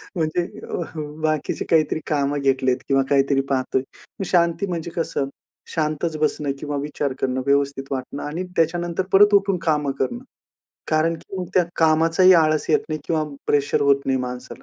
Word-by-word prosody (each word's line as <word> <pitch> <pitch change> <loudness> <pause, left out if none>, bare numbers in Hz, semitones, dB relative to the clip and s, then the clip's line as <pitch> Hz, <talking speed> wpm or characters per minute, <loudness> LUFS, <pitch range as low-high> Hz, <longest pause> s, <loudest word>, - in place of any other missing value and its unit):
म्हणजे 165 +1 0 0.3
अ, - - -3 0.2
हं, 150 0 -6
बाकीचे 155 -2 -1
काहीतरी 155 -1 +2
कामं 145 -1 0
घेतलेत, 130 -2 +2
किंवा 135 -1 +3
काहीतरी 140 0 +3
पाहतोय. 130 -1 0 0.4
मग 195 - -2
शांती 170 +1 +2
म्हणजे 170 -1 -4
कसं, 140 -4 -1 0.5
शांतच 155 0 -1
बसणं 150 -2 0
किंवा 145 -1 -4
विचार 145 -1 -2
करणं, 130 0 0
व्यवस्थित 140 -1 0
वाटणं 135 +1 -4
आणि 160 +5 -3
त्याच्यानंतर 170 +2 +1
परत 205 +1 +7
उठून 195 -2 +3
कामं 150 -3 +1
करणं. 240 - -2 0.7
कारण 160 +2 +2
की 190 +4 -10
मग 180 - -3
त्या 180 -2 +4
कामाचा 165 +2 +3
ही 185 0 +9
आळस 155 -2 +3
येत 150 - +5
नाही. 155 -1 -3
किंवा 160 -2 0 0.2
प्रेशर 145 -1 +2
होत 140 -1 +4
नाही 130 -1 +1
माणसाला 125 0 -6
155 Hz, 170 wpm, -22 LUFS, 140-165 Hz, 0.7 s, ही